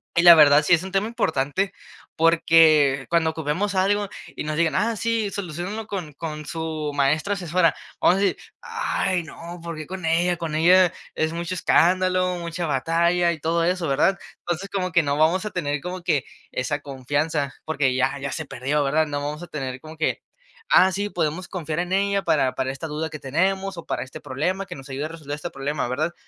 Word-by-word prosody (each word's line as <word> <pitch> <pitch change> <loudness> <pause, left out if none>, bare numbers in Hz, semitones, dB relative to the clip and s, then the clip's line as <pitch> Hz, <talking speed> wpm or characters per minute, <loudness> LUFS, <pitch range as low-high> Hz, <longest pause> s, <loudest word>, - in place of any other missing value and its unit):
Y 170 - +4
la 170 -1 +11
verdad, 150 -1 +7
sí 150 - +3
es 170 0 +4
un 190 - -7
tema 195 +2 +1
importante 190 - -1 0.4
porque 160 -4 +4
cuando 170 -1 +2
ocupemos 160 +6 -2
algo 200 +2 +1 0.3
y - - -4
nos 155 0 -3
digan: 165 -1 +2
"Ah, 230 +4 +1
sí, 225 -1 0
soluciónalo 195 +4 -5
con 180 -8 -5
con 150 0 -6
su 155 -1 -3
maestra 150 +8 +1
asesora", 175 -3 +1 0.3
vamos 180 - +5
a - - -1
decir: 195 -1 +1 0.2
"Ay, 455 - -1
no, 170 +2 -9
porque 155 -3 -6
con 185 -2 -6
ella 170 +2 +2
con 165 -3 -4
ella 180 +2 +5 0.2
es 155 0 0
mucho 170 +2 -4
escándalo, 185 +1 +2
mucha 170 0 -4
batalla 170 +4 +2
y 165 - -5
todo 165 +2 0
eso", 180 -1 0
¿verdad? 165 +8 +2 0.2
Entonces 175 +3 -4
como 185 -2 -2
que 170 -1 +4
no 140 -1 0
vamos 165 +6 +2
a 210 - -3
tener 150 -5 -2
como 180 +4 -6
que 145 -5 +1 0.3
esa 125 +4 -2
confianza 145 +1 -2
porque 145 -4 0
ya 135 +2 +1
ya 140 0 -4
se 160 - -4
perdió, 135 +3 -1
¿verdad? 150 +3 +2
No 145 -1 -3
vamos 150 +3 -4
a - - -8
tener 135 -5 -5
como 155 +3 -11
que: 160 - -1 0.5
"Ah, 190 - +6
sí, 200 +2 -2
podemos 170 0 -2
confiar 160 -3 -4
en 175 +1 -2
ella 200 0 +2
para 140 -6 +2
para 130 - -1
esta 135 +4 -6
duda 155 +2 -3
que 155 -1 -8
tenemos 190 +7 -1
o 170 - -8
para - - -2
este 130 - -10
problema 180 +9 -2
que 180 - -8
nos 135 +1 -11
ayude 135 +2 -3
a - - -2
resolver 155 -3 -6
este 150 +4 -6
problema", 140 -1 -2
¿verdad? 155 +7 -1
165 Hz, 205 wpm, -23 LUFS, 150-185 Hz, 0.5 s, la